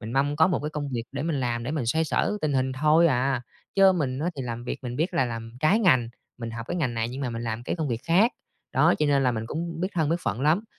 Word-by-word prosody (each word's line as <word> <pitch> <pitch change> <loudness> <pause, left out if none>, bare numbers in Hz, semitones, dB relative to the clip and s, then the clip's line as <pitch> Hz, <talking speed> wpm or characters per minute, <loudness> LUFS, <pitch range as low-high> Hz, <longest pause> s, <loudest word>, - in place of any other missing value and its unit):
mình 110 +2 -6
mong 140 +2 +1
có 160 - +5
một 180 - +1
cái 150 - -3
công 150 -2 -4
việc 120 -4 -3
để 140 0 -3
mình 155 -3 -1
làm 120 -2 -1
để 125 - -3
mình 150 -6 -2
xoay 160 +7 +2
sở 185 +6 0
tình 155 -2 0
hình 130 -1 +1
thôi 155 +5 +4
à, 130 -3 +1 0.3
chớ 195 -1 +6
mình 135 -7 -1
á, 160 +4 -1
thì 135 - -3
làm 120 -1 -5
việc - - -4
mình 125 -1 -5
biết 165 +6 -1
là 130 - +3
làm 115 -1 -5
trái 155 +8 +4
ngành, 130 - +4 0.3
mình 115 -1 -5
học 115 0 -6
cái - - -2
ngành 130 -8 -1
này 115 0 -1
nhưng 130 +3 -6
mà 130 -3 -2
mình 115 0 -4
làm 115 0 -3
cái - - -3
công 155 -3 -2
việc 115 -2 -2
khác. 190 +9 +4 0.4
Đó, - - +4
cho 150 - +2
nên 140 -1 +3
là 125 -2 +2
mình 110 -1 -3
cũng 165 +4 -4
biết 185 - 0
thân 160 -4 +1
biết 165 - +2
phận 110 - -2
lắm, 160 +9 +2
140 Hz, 300 wpm, -26 LUFS, 120-160 Hz, 0.4 s, chớ